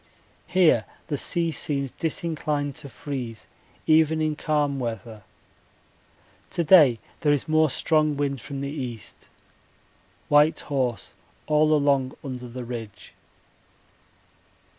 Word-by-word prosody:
Here 170 -12 +4 0.2
the 150 - 0
sea 170 +3 0
seems 140 -5 -2
disinclined 155 -3 -2
to 145 -3 -8
freeze 125 -5 -6 0.4
even 160 0 +4
in 155 -1 0
calm 145 -3 0
weather. 115 -2 -5 1.3
To 170 - -1
day 150 -8 +7 0.2
there 150 - +2
is 145 -2 0
more 155 0 +3
strong 155 +1 +1
wind 140 -3 -2
from 140 +1 -6
the 140 0 -3
east. 125 -7 -7 1.0
White 150 +2 +4
horse 125 -7 -2 0.3
all 155 0 +3
along 140 -3 +2
under 125 -3 -6
the 125 +1 -7
ridge. 115 -4 -8
145 Hz, 115 wpm, -25 LUFS, 125-155 Hz, 1.3 s, day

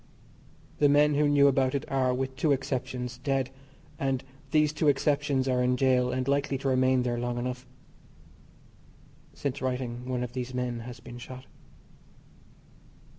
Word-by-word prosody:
The 145 - +5
men 150 +1 +5
who 145 0 +3
knew 140 -1 +5
about 135 -1 +2
it 140 - -2
are, 130 -2 +1
with 130 +1 -2
two 150 +2 +1
exceptions, 125 -2 -2
dead, 135 -1 -1 0.5
and 135 -1 0 0.3
these 150 0 +3
two 155 0 0
exceptions 140 -1 +2
are 125 -1 +2
in 125 0 +2
gaol, 125 -1 +3
and 130 0 -2
likely 140 0 +1
to 135 - -4
remain 130 -1 +3
there 120 -1 -1
long 120 0 -2
enough. 125 +1 -4 1.7
(Since 140 -1 -3
writing 125 -1 -3
one 125 -1 -1
of 120 -1 -6
these 125 0 -4
men 125 -1 -2
has 120 +1 -8
been 120 0 -10
shot.) 130 +1 -9
130 Hz, 155 wpm, -28 LUFS, 125-140 Hz, 1.7 s, The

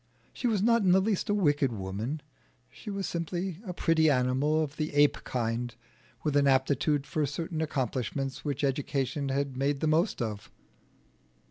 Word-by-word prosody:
She 250 - -2
was 210 -4 +1
not 235 0 +4
in 185 -3 +4
the 190 - +6
least 200 0 0
a - - +3
wicked 145 -8 +2
woman; 110 +8 -4 0.5
she 215 - -10
was 195 -1 -3
simply 175 +1 -3
a - - -2
pretty 165 -2 +3
animal 140 +4 +2
of 145 0 -6
the 155 -1 -3
ape 145 0 +4
kind, 120 -1 -2 0.5
with 150 -2 0
an 140 -1 +4
aptitude 140 +2 +2
for 155 - -1
certain 160 +3 -3
accomplishments 135 -2 -2
which 145 -1 -2
education 140 0 -1
had 135 0 -1
made 140 +2 0
the - - -1
most 160 +6 +2
of. 105 -4 -4
145 Hz, 165 wpm, -29 LUFS, 130-165 Hz, 0.5 s, the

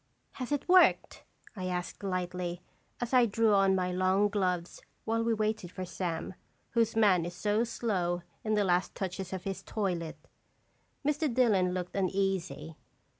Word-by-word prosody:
"Has 255 0 -6
it 290 - -1
worked?" 365 0 +4 0.3
I 185 -3 -4
asked, 180 -1 -4
lightly, 180 -2 -3 0.4
as 245 +1 -4
I 250 -2 +6
drew 220 +1 +2
on 195 -1 +4
my 180 -1 0
long 185 +3 +2
gloves 180 -4 -1 0.2
while 230 +1 0
we 230 - +1
waited 215 -4 -2
for 185 - -5
Sam, 175 0 -4 0.4
whose 230 -2 +1
man 200 -6 +4
is 175 +1 -5
so 210 +4 +1
slow 185 -7 -1 0.2
in 215 -1 +1
the 210 - +3
last 180 -1 +1
touches 190 -1 -4
of 190 -1 -4
his 195 -1 -4
toilet. 180 -6 -3 0.9
Mr. 295 0 +1
Dillon 205 -7 +3
looked 180 -1 -4
uneasy. 190 -4 -1
190 Hz, 155 wpm, -30 LUFS, 180-220 Hz, 0.9 s, I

